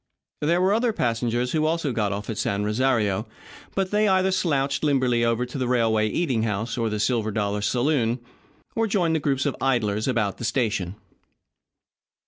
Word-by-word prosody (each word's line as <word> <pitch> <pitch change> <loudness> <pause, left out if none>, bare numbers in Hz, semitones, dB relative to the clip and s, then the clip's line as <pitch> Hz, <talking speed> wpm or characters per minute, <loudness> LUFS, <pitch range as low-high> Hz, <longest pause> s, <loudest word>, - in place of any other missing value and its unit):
There 165 +4 +2
were 190 +2 +3
other 230 +1 +1
passengers 120 - 0
who 155 -1 +1
also 165 -3 0
got 105 -3 0
off 100 +1 -4
at 110 - -4
San 100 0 0
Rosario, 110 -2 +1 0.5
but 190 -1 0
they 210 +1 +3
either 190 -1 +3
slouched 140 -7 0
limberly 130 -5 +2
over 115 +1 +1
to 125 +3 -7
the 130 - 0
railroad 115 -3 +2
eating 135 -10 0
house 110 +1 -2
or 115 -2 0
the 105 0 -3
Silver 115 -1 +1
Dollar 105 -1 -1
saloon, 120 +1 +1 0.6
or 225 0 +1
joined 180 -6 +1
the - - +1
groups 135 -3 0
of 145 - 0
idlers 110 -5 +1
about 110 -7 0
the - - -6
station. 110 -6 -1
125 Hz, 175 wpm, -24 LUFS, 110-150 Hz, 0.6 s, were